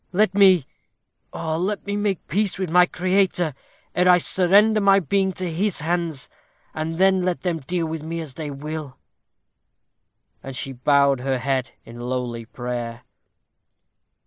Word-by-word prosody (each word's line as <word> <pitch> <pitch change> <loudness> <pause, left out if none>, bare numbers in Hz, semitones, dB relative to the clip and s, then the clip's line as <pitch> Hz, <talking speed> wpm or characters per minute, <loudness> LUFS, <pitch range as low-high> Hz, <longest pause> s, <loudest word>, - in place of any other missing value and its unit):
Let 195 +1 +2
me, 190 -7 +5 0.7
oh! 160 -1 -3
let 200 +3 -2
me 200 0 -2
make 205 -2 0
my - - -45
peace 205 -1 +1
with 185 -4 -3
my 180 +1 +6
Creator, 180 -3 0 0.4
ere 180 +1 +3
I 180 - +7
surrender 200 +5 +4
my 195 0 +5
being 190 +2 0
to 185 +1 -4
His 190 0 -1
hands, 165 -3 -2 0.5
and 160 +1 -3
then 190 0 +4
let 180 -1 -1
them 175 -3 -1
deal 170 +4 -2
with 160 -1 -4
me 165 +2 -5
as 155 -5 -7
they 155 +1 -6
will." 150 0 -6 1.4
And 135 -1 -8
she 130 +3 -3
bowed 140 +1 +3
her 130 +1 -1
head 130 0 -2
in 115 +1 -11
lowly 120 -1 -4
prayer. 120 0 -5
165 Hz, 155 wpm, -22 LUFS, 135-190 Hz, 1.4 s, I